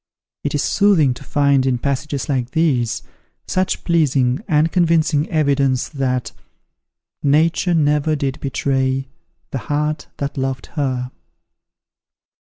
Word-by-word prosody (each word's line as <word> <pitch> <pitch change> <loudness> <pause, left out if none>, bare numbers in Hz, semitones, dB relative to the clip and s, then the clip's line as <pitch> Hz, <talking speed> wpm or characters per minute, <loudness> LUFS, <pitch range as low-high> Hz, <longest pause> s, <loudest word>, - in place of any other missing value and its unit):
It 145 - -1
is 145 - 0
soothing 180 -11 +3
to 125 - -12
find, 140 -1 +2
in 125 -2 +2
passages 140 +2 -2
like 130 -4 -1
these, 135 -8 +1 0.4
such 185 0 -1
pleasing 140 - +2
and 160 -2 +2
convincing 165 -4 +2
evidence 140 -4 +1
that 130 -4 -2 0.9
"Nature 165 +5 +2
never 150 0 +2
did 140 -2 -2
betray, 135 -1 -1 0.4
The 135 - -2
heart 150 0 -1
that 140 -1 -3
loved 130 -1 -2
her." 130 -4 -2
140 Hz, 115 wpm, -19 LUFS, 130-155 Hz, 0.9 s, soothing